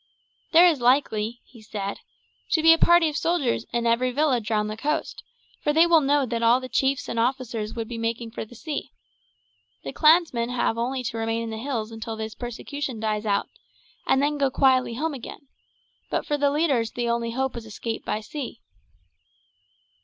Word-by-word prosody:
"There 340 Hz, +2 st, +8 dB
is 320 Hz, -7 st, +3 dB
likely," 240 Hz, -3 st, +1 dB
he 235 Hz, -4 st, -17 dB
said, 205 Hz, -2 st, -5 dB, 0.5 s
"to 320 Hz, -3 st, +2 dB
be 325 Hz, 0 st, +9 dB
a 330 Hz, -, +1 dB
party 345 Hz, -1 st, +5 dB
of 300 Hz, -, -3 dB
soldiers 330 Hz, -7 st, 0 dB
in 235 Hz, 0 st, -1 dB
every 235 Hz, +2 st, +2 dB
village 250 Hz, -4 st, 0 dB
round 210 Hz, -1 st, +1 dB
the 215 Hz, -, -4 dB
coast, 300 Hz, +7 st, -2 dB, 0.4 s
for 295 Hz, -, +1 dB
they 325 Hz, +2 st, +6 dB
will 335 Hz, -2 st, +5 dB
know 285 Hz, 0 st, +2 dB
that 235 Hz, -1 st, -3 dB
all 235 Hz, +2 st, +5 dB
the 255 Hz, -, -7 dB
chiefs 270 Hz, +1 st, 0 dB
and 230 Hz, -, -2 dB
officers 230 Hz, -3 st, -2 dB
would 230 Hz, -1 st, -4 dB
be 230 Hz, -1 st, -6 dB
making 230 Hz, 0 st, -3 dB
for -, -, -5 dB
the 220 Hz, +2 st, -14 dB
sea. 300 Hz, +5 st, -5 dB, 0.9 s
The -, -, -6 dB
clansmen 305 Hz, -7 st, +4 dB
have 245 Hz, -2 st, 0 dB
only 250 Hz, +3 st, -2 dB
to 230 Hz, -1 st, -4 dB
remain 225 Hz, +1 st, -1 dB
in 225 Hz, -, -5 dB
the 220 Hz, -, -5 dB
hills 230 Hz, -4 st, -3 dB
until 225 Hz, 0 st, -6 dB
this 220 Hz, 0 st, -5 dB
persecution 250 Hz, +1 st, -5 dB
dies 215 Hz, 0 st, -2 dB
out, 200 Hz, -1 st, +1 dB, 0.6 s
and 270 Hz, -, +3 dB
then 295 Hz, 0 st, 0 dB
go 275 Hz, -1 st, +3 dB
quietly 260 Hz, -3 st, +2 dB
home 315 Hz, +5 st, -2 dB
again; 275 Hz, +2 st, -9 dB, 0.6 s
but -, -, -1 dB
for 295 Hz, -, 0 dB
the 285 Hz, -1 st, +2 dB
leaders 280 Hz, -7 st, +1 dB
the 240 Hz, -1 st, -2 dB
only 235 Hz, 0 st, 0 dB
hope 265 Hz, +1 st, -1 dB
is 230 Hz, -2 st, -7 dB
escape 225 Hz, +1 st, -5 dB
by 215 Hz, -, -2 dB
sea." 245 Hz, +1 st, -7 dB
245 Hz, 190 wpm, -25 LUFS, 225-285 Hz, 0.9 s, be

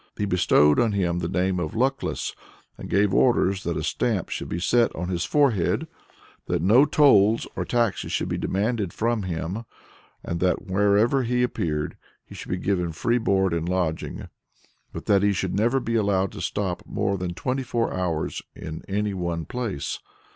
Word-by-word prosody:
"He 105 Hz, -, 0 dB
bestowed 75 Hz, -6 st, +4 dB
on 115 Hz, -3 st, +2 dB
him 90 Hz, -3 st, 0 dB
the 85 Hz, -, -2 dB
name 90 Hz, +1 st, 0 dB
of 80 Hz, -3 st, -4 dB
Luckless, 135 Hz, +3 st, -1 dB, 0.4 s
and -, -, -9 dB
gave 100 Hz, -1 st, +2 dB
orders 100 Hz, -6 st, +3 dB
that 85 Hz, -4 st, -2 dB
a -, -, -3 dB
stamp -, -, -1 dB
should -, -, -4 dB
be 85 Hz, -, -2 dB
set 115 Hz, +7 st, +3 dB
on 90 Hz, +2 st, -4 dB
his 90 Hz, -2 st, -1 dB
forehead, 115 Hz, -, +2 dB, 0.6 s
that -, -, -1 dB
no 115 Hz, +9 st, +6 dB
tolls 115 Hz, -8 st, +4 dB
or -, -, -2 dB
taxes 120 Hz, -4 st, 0 dB
should -, -, -1 dB
be -, -, -2 dB
demanded 105 Hz, -2 st, -1 dB
from 115 Hz, 0 st, 0 dB
him, 90 Hz, +3 st, -4 dB, 0.6 s
and 85 Hz, -, -3 dB
that 90 Hz, 0 st, 0 dB
wherever 105 Hz, +7 st, +3 dB
he 125 Hz, 0 st, +1 dB
appeared 75 Hz, -11 st, -2 dB, 0.3 s
he -, -, -13 dB
should -, -, -9 dB
be 90 Hz, -, -1 dB
given 90 Hz, -3 st, -1 dB
free 120 Hz, +9 st, +1 dB
board 95 Hz, -5 st, +1 dB
and 85 Hz, +1 st, -1 dB
lodging, 90 Hz, -4 st, -2 dB, 0.6 s
but -, -, -7 dB
that 100 Hz, -1 st, +4 dB
he 100 Hz, 0 st, +3 dB
should 95 Hz, -, -2 dB
never 115 Hz, +6 st, +2 dB
be 115 Hz, -2 st, -3 dB
allowed 100 Hz, -3 st, +1 dB
to -, -, -8 dB
stop 95 Hz, -4 st, -2 dB
more 100 Hz, -, -1 dB
than 90 Hz, -2 st, -4 dB
twenty 130 Hz, +6 st, -2 dB
four 120 Hz, -2 st, -1 dB
hours 85 Hz, -4 st, -2 dB
in 80 Hz, 0 st, -7 dB
any 105 Hz, +1 st, -1 dB
one 85 Hz, -3 st, -3 dB
place." 110 Hz, -, -4 dB
100 Hz, 180 wpm, -25 LUFS, 90-115 Hz, 0.6 s, no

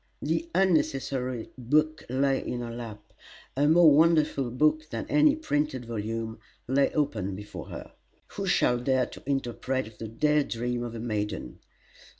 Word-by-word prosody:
The 335 Hz, -, -1 dB
unnecessary 135 Hz, -9 st, 0 dB
book 155 Hz, +5 st, +1 dB
lay 135 Hz, +1 st, +1 dB
in 120 Hz, -, -3 dB
her 120 Hz, -1 st, -5 dB
lap; 110 Hz, -3 st, -9 dB, 0.4 s
a 145 Hz, +2 st, +3 dB
more 160 Hz, 0 st, +7 dB
wonderful 155 Hz, -5 st, +3 dB
book 155 Hz, +5 st, +1 dB
than -, -, -4 dB
any 300 Hz, 0 st, +5 dB
printed 145 Hz, -, -1 dB
volume 115 Hz, 0 st, -4 dB, 0.3 s
lay 135 Hz, +2 st, +2 dB
open 110 Hz, -, -1 dB
before 105 Hz, +2 st, -8 dB
her. -, -, -8 dB, 0.4 s
Who -, -, -5 dB
shall 125 Hz, -, +3 dB
dare 130 Hz, 0 st, +2 dB
to -, -, -11 dB
interpret 130 Hz, -3 st, -2 dB
the 115 Hz, -, -5 dB
day 150 Hz, +7 st, +2 dB
dream 120 Hz, -2 st, -2 dB
of 120 Hz, -1 st, -5 dB
a -, -, -5 dB
maiden? 105 Hz, -3 st, -3 dB
130 Hz, 150 wpm, -28 LUFS, 115-150 Hz, 0.4 s, more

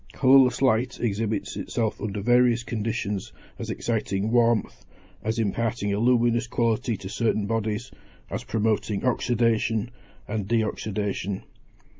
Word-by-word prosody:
Colourless 130 Hz, -1 st, +5 dB
light 125 Hz, 0 st, +2 dB
exhibits 110 Hz, -1 st, -1 dB
itself 110 Hz, -3 st, -2 dB
under 105 Hz, -1 st, -3 dB
various 120 Hz, +1 st, +4 dB
conditions 105 Hz, -4 st, -3 dB, 0.3 s
as -, -, -5 dB
exciting 110 Hz, -2 st, -1 dB
warmth, 120 Hz, -2 st, +2 dB, 0.4 s
as 110 Hz, +2 st, -2 dB
imparting 110 Hz, -1 st, -1 dB
a 100 Hz, -, 0 dB
luminous 120 Hz, 0 st, +3 dB
quality 115 Hz, -1 st, 0 dB
to 95 Hz, -, -8 dB
certain 110 Hz, 0 st, 0 dB
bodies, 110 Hz, +1 st, -2 dB, 0.4 s
as -, -, -3 dB
promoting 105 Hz, -1 st, 0 dB
oxydation 115 Hz, -3 st, +1 dB, 0.4 s
and 105 Hz, -2 st, -3 dB
de 115 Hz, +1 st, +2 dB
oxydation. 105 Hz, -2 st, -3 dB
110 Hz, 120 wpm, -25 LUFS, 105-120 Hz, 0.4 s, Colourless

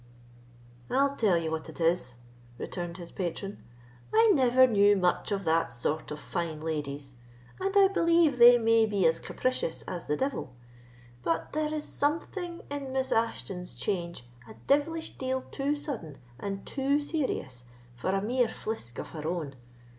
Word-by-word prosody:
"I'll 280 Hz, +1 st, +2 dB
tell 205 Hz, -9 st, +3 dB
you 165 Hz, -1 st, -2 dB
what 160 Hz, 0 st, -4 dB
it 160 Hz, -, -11 dB
is," 165 Hz, -7 st, +1 dB, 0.4 s
returned 175 Hz, +5 st, -5 dB
his 170 Hz, -2 st, -8 dB
patron, 195 Hz, +2 st, -4 dB, 0.5 s
"I 450 Hz, 0 st, +6 dB
never 260 Hz, -3 st, +5 dB
knew 205 Hz, -4 st, +5 dB
much 180 Hz, +2 st, +1 dB
of 200 Hz, -1 st, -1 dB
that 165 Hz, -5 st, +2 dB
sort 135 Hz, +7 st, -2 dB
of 150 Hz, -, -5 dB
fine 170 Hz, -3 st, -3 dB
ladies, 145 Hz, -3 st, -4 dB, 0.5 s
and 385 Hz, +1 st, 0 dB
I 395 Hz, -1 st, +8 dB
believe 335 Hz, -7 st, +3 dB
they 240 Hz, +1 st, +10 dB
may 225 Hz, -1 st, +4 dB
be 200 Hz, -4 st, +1 dB
as 160 Hz, 0 st, +3 dB
capricious 255 Hz, -10 st, -2 dB
as 175 Hz, -2 st, -6 dB
the 150 Hz, -, 0 dB
devil; 265 Hz, -, -3 dB, 0.7 s
but 165 Hz, +1 st, -1 dB
there 305 Hz, 0 st, 0 dB
is 305 Hz, -1 st, -2 dB
something 340 Hz, +4 st, -2 dB
in 280 Hz, -2 st, -4 dB
Miss 265 Hz, 0 st, -1 dB
Ashton's 195 Hz, -5 st, -1 dB
change 170 Hz, -, -3 dB, 0.2 s
a -, -, -11 dB
devilish 320 Hz, +3 st, +1 dB
deal 260 Hz, 0 st, -1 dB
too 280 Hz, +1 st, 0 dB
sudden 235 Hz, -, -6 dB, 0.2 s
and 195 Hz, -1 st, -4 dB
too 280 Hz, +1 st, +1 dB
serious 260 Hz, -, -3 dB, 0.3 s
for 125 Hz, +9 st, -3 dB
a 195 Hz, +1 st, +1 dB
mere 245 Hz, +2 st, +2 dB
flisk 215 Hz, -, -6 dB
of -, -, -5 dB
her 155 Hz, -1 st, -6 dB
own. 160 Hz, -5 st, -3 dB
205 Hz, 160 wpm, -29 LUFS, 165-275 Hz, 0.7 s, they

